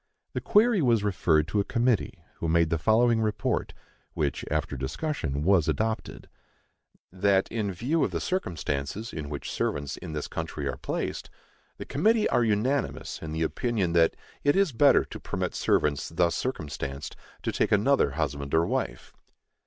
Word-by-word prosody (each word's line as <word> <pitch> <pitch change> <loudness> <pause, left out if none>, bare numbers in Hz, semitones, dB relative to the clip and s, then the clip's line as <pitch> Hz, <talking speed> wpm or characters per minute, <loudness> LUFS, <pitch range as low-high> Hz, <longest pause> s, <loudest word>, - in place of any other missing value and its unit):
The - - -2
query 215 -2 +4
was 115 -6 +3
referred 85 -6 +2
to 105 - +1
a - - +3
committee, 120 -1 0
who 85 - -3
made 85 0 +3
the 80 - +1
following 115 +5 +3
report; 110 -1 -1 0.4
which, 75 -2 -1
after 75 -1 -1
discussion, 70 - -3
was 90 -3 +4
adopted: 110 0 -2 0.8
That, 95 +1 +2
in 110 -3 -1
view 130 - 0
of - - +1
the - - -3
circumstances 90 - -3
in 75 -3 -5
which 75 -1 -5
servants 70 0 -2
in 85 -3 -7
this 75 -1 -3
country - - -4
are - - -3
placed, - - -4 0.5
the - - -7
committee 215 +9 +2
are 120 - +3
unanimous 115 +6 -1
in 80 - -6
the 80 +1 -1
opinion 100 -1 -1
that 85 -1 +4 0.3
it 145 - +3
is 195 -4 +3
better 140 +4 +5
to - - -9
permit - - -3
servants 75 -2 +1
thus 85 +1 +1
circumstanced 70 - -4 0.3
to - - 0
take - - 0
another - - +3
husband 70 +1 -1
or 80 +1 +4
wife. 60 -5 -3
95 Hz, 160 wpm, -27 LUFS, 75-120 Hz, 0.8 s, better